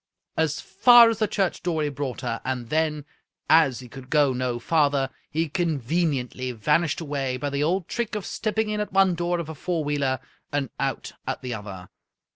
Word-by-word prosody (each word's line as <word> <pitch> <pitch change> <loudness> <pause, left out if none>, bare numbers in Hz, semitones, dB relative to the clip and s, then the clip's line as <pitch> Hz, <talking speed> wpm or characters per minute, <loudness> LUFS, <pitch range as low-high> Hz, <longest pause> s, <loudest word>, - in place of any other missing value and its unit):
As 160 -2 0
far 235 +4 +7
as 225 - -4
the 215 - +2
church 195 -3 -1
door 165 -3 -1
he 150 - 0
brought 140 -3 -4
her, 115 -2 -3
and 125 -3 -3
then, 155 -2 0 0.4
as 145 -7 +4
he 125 - -10
could 130 +2 -11
go 145 -3 +3
no 125 -1 -1
farther, 140 0 +1 0.2
he 160 +2 0
conveniently 145 -5 -1
vanished 150 +9 +1
away 140 -4 -2
by 145 +2 -3
the 140 +1 -1
old 175 +3 0
trick 235 -2 -3
of 210 - -3
stepping 220 0 -1
in 210 0 -1
at 210 - -3
one 195 -1 +4
door 175 +1 -1
of 170 -2 -4
a 160 - -6
four 165 +2 -2
wheeler 140 -3 0 0.3
and 145 -3 -1
out - - -2 0.2
at - - -3
the 125 -1 -3
other. 100 -4 -8
150 Hz, 195 wpm, -25 LUFS, 130-175 Hz, 0.4 s, far